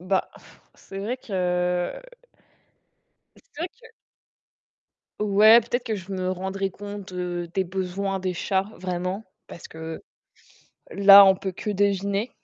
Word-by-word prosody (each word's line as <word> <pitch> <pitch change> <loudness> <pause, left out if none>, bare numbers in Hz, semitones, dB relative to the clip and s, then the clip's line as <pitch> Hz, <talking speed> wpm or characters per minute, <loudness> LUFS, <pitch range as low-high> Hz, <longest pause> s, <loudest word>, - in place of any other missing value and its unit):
bah, 185 +1 -1 0.4
c'est 195 - -10
vrai 225 +6 -3
que 180 -4 -1 1.4
c'est - - -21 0.2
vrai 335 +3 -2
que 470 0 -19 1.3
Ouais, 210 +2 +6
peut-être 240 +2 -3
que 225 -3 -2
je 195 0 -7
me 185 -1 -2
rendrais 190 +1 -3
compte, 205 0 -9
heu, 175 -1 -4
des 190 -1 0
besoins 190 +1 -3
des 185 -1 -2
chats 190 +2 -1
vraiment, 185 +3 -4 0.2
parce 170 - -11
que 160 0 -8 0.9
là, 200 0 +9
on 190 - +5
peut 190 0 -5
que 195 - -7
deviner 200 +2 0
195 Hz, 130 wpm, -24 LUFS, 180-205 Hz, 1.4 s, là